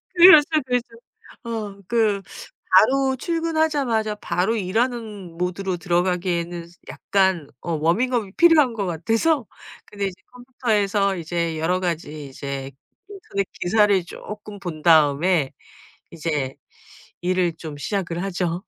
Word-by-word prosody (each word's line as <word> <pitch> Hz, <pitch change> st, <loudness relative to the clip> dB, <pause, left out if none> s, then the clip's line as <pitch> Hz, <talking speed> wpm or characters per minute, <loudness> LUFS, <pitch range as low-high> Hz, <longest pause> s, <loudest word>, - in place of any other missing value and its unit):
그렇죠, 345 Hz, -4 st, +9 dB, 0.2 s
그렇죠 250 Hz, -1 st, -1 dB, 0.6 s
어 215 Hz, -4 st, -5 dB
그 220 Hz, -4 st, +1 dB, 0.5 s
바로 265 Hz, +7 st, +5 dB
출근 330 Hz, +2 st, -2 dB
하자마자 255 Hz, -9 st, +1 dB
바로 210 Hz, +1 st, -1 dB
일하는 215 Hz, -3 st, -2 dB
모드로 180 Hz, +1 st, -2 dB
들어가기에는 175 Hz, -1 st, -1 dB, 0.2 s
약간 190 Hz, -6 st, 0 dB
어 170 Hz, -, -3 dB
워밍업이 200 Hz, +7 st, 0 dB
필요한 315 Hz, -7 st, +5 dB
것 210 Hz, -3 st, -2 dB
같아서 225 Hz, -, 0 dB, 0.4 s
근데 200 Hz, -1 st, -4 dB
이제 190 Hz, 0 st, -9 dB
컴퓨터에서 210 Hz, -6 st, 0 dB
이제 170 Hz, -1 st, -2 dB
여러 175 Hz, +3 st, +1 dB
가지 155 Hz, -4 st, -4 dB
이제 135 Hz, 0 st, -6 dB, 0.4 s
인터넷 370 Hz, -, -4 dB
기사를 200 Hz, 0 st, +3 dB
쪼끔 210 Hz, +2 st, -9 dB
본 170 Hz, -5 st, -6 dB
다음에 155 Hz, -1 st, +4 dB, 0.6 s
이제 150 Hz, -5 st, -3 dB, 0.7 s
일을 180 Hz, -1 st, +1 dB
좀 155 Hz, -3 st, -7 dB
시작을 175 Hz, +1 st, -3 dB
하죠. 180 Hz, -2 st, -2 dB
195 Hz, 265 characters per minute, -22 LUFS, 170-230 Hz, 0.7 s, 그렇죠